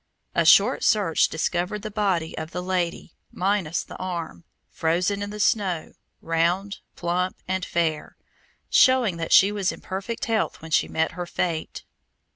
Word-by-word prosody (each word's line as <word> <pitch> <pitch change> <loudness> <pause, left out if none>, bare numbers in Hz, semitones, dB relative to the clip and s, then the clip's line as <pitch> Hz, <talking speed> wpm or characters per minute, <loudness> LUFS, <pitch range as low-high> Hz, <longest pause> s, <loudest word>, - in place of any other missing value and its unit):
A - - +2
short - - +5
search 195 -7 +3
discovered 180 +5 -2
the 215 - -5
body 195 -6 -1
of 160 0 -5
the 180 +1 -5
lady, 180 -2 -2 0.2
minus 185 -4 -1
the - - -11
arm, 175 -2 -5 0.3
frozen 180 +5 0
in 205 - -3
the 210 +1 -7
snow, 190 -6 0 0.3
round, 175 +5 0 0.2
plump, 180 +2 -1
and 185 0 -1
fair, 165 -3 -2 0.5
showing 250 -9 +4
that 165 -1 -4
she 195 +2 +7
was 200 -3 0
in - - -10
perfect 195 +5 -5
health 225 -1 -1
when 160 0 -11
she - - +3
met 160 0 0
her 175 0 -6
fate. 170 -2 -3
180 Hz, 155 wpm, -24 LUFS, 165-200 Hz, 0.5 s, she